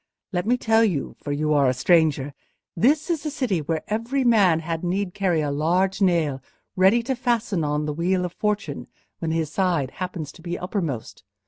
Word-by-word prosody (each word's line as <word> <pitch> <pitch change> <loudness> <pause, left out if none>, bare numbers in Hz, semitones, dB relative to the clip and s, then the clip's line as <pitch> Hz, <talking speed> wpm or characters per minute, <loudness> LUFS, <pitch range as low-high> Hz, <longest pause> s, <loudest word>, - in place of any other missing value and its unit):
Let 180 +1 -2
me 245 +2 +3
tell 225 -1 +3
you—for 155 -6 -2
you 150 +1 0
are 140 -3 +4
a 130 - 0
stranger—this 165 - +1
is 325 -3 -1
a 305 - -2
city 250 - -1
where 160 +1 -2
every 230 +6 -1
man 200 -9 +4
had 165 0 -4
need 180 +1 -1
carry 180 -5 +1
a 145 -1 -1
large 180 +7 +1
nail 165 -8 +2 0.3
ready 195 +6 +4
to 265 +2 -1
fasten 235 -8 0
on 150 0 -1
the 150 - -2
wheel 180 +3 0
of 175 - -6
Fortune 205 - -2 0.3
when 165 - -2
his 160 -2 -1
side 170 -8 0
happens 175 -5 -4
to 170 - -16
be 175 +1 -4
uppermost. 170 - -4
175 Hz, 185 wpm, -24 LUFS, 155-210 Hz, 0.3 s, are